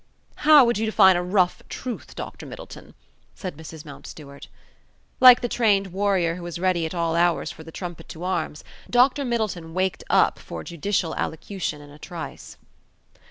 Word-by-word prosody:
"How 295 -3 +7
would 235 -3 +1
you 220 - 0
define 190 -3 +6
a 175 - +1
rough 180 0 +1
truth, 250 -3 -6
Dr. - - -8
Middleton?" - - -11 0.4
said 185 -5 -6
Mrs. 160 0 -10
Mountstuart. 140 -1 -11 0.7
Like 250 -1 +9
the 240 - -1
trained 200 -6 +1
warrior 190 -4 +1
who 175 - -8
is 175 - -5
ready 175 -2 +1
at 160 - -7
all 165 -1 0
hours 175 0 +1
for 160 - -11
the 160 - -11
trumpet 175 0 -8
to 165 - -8
arms, 170 -5 -2 0.3
Dr. 255 +3 +4
Middleton 215 -9 -3
waked 185 -1 -1
up - - +3
for 80 -1 -8
judicial 170 0 -2
allocution 160 -2 -4
in 145 0 -14
a 145 - -15
trice. 170 -1 -8
180 Hz, 165 wpm, -24 LUFS, 160-205 Hz, 0.7 s, Like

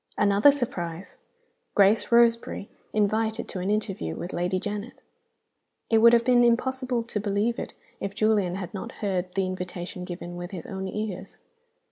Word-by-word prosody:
'" - - -42
Another 200 +7 +6
surprise! 185 - -4 0.6
Grace 205 +3 +4
Roseberry 235 -3 +3 0.2
invited 215 +1 0
to 185 - -4
an 185 +2 -2
interview 200 - -1
with 175 - -6
Lady 180 +2 0
Janet! 205 +4 -5 0.9
It 225 - +6
would 235 +1 +7
have 235 -1 +4
been 245 -1 +5
impossible 250 0 +1
to 230 -2 -3
believe 205 +3 0
it, - - -6 0.2
if 200 0 -4
Julian 205 -4 +2
had 185 -3 -6
not 195 - -6
heard 185 -3 -2
the 195 -1 +1
invitation 180 -1 -5
given 175 -1 -7
with 175 0 -6
his 185 -4 -7
own 190 0 -5
ears. 200 -1 -5
200 Hz, 160 wpm, -26 LUFS, 185-230 Hz, 0.9 s, would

